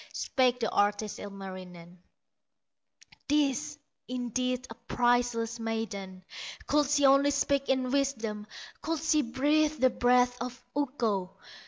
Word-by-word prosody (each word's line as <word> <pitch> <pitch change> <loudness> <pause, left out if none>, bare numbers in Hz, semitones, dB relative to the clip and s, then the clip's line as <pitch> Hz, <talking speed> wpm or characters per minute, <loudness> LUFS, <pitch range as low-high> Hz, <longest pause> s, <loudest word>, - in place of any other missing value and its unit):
Spake 250 -2 +1
the 225 - 0
artist, 205 +1 +1
Ilmarinen: 185 -3 -9 1.3
"This, 295 0 +1 0.3
indeed, 250 0 -2
a - - -4
priceless 240 0 0
maiden, 210 -5 -4 0.4
Could 295 -1 +2
she 290 -1 +3
only 275 +1 +6
speak 280 0 +1
in 260 -1 +1
wisdom, 230 -7 -1 0.3
Could 325 0 -1
she 310 0 +2
breathe 295 +4 +1
the 255 -1 +4
breath 245 0 +3
of 250 +1 -5 0.2
Ukko!" 230 -10 -1
245 Hz, 115 wpm, -29 LUFS, 220-275 Hz, 1.3 s, only